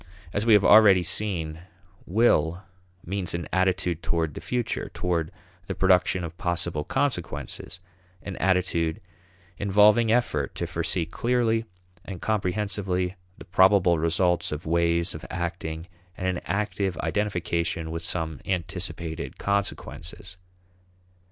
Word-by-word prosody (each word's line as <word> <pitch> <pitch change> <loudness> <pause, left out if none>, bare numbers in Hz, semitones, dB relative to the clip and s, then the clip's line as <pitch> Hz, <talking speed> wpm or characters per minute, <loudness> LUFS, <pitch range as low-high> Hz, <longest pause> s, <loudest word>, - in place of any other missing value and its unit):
As 105 +3 -1
we 115 - +7
have 105 -2 +6
already 100 -4 +7
seen, 85 -4 -1 0.5
will 90 -4 +2 0.4
means 95 -1 -1
an 85 - -4
attitude 90 -2 +1
toward 80 -3 -1
the - - -7
future, 120 -2 -2
toward 85 -3 -1 0.4
the - - -3
production 90 -1 +3
of 85 0 -7
possible 85 -3 -2
consequences, 95 - -3 0.4
an 100 - -5
attitude 90 -3 +1 0.6
involving 105 +3 +5
effort 75 - 0
to - - -2
foresee 85 - -1
clearly 115 +4 0 0.4
and 95 -3 -7
comprehensively 95 -2 -1 0.2
the - - -11
probable 95 -2 +4
results 85 +2 +1
of 75 +1 -5
ways 85 +1 +2
of 80 - -8
acting, 80 -2 -4 0.3
and 95 - -4
an 90 -1 -1
active 100 -1 -1
identification 85 -2 -1
with 80 0 -4
some 80 -4 -3
anticipated 85 -2 -4
consequences. 100 -2 -3
90 Hz, 120 wpm, -26 LUFS, 85-100 Hz, 0.6 s, we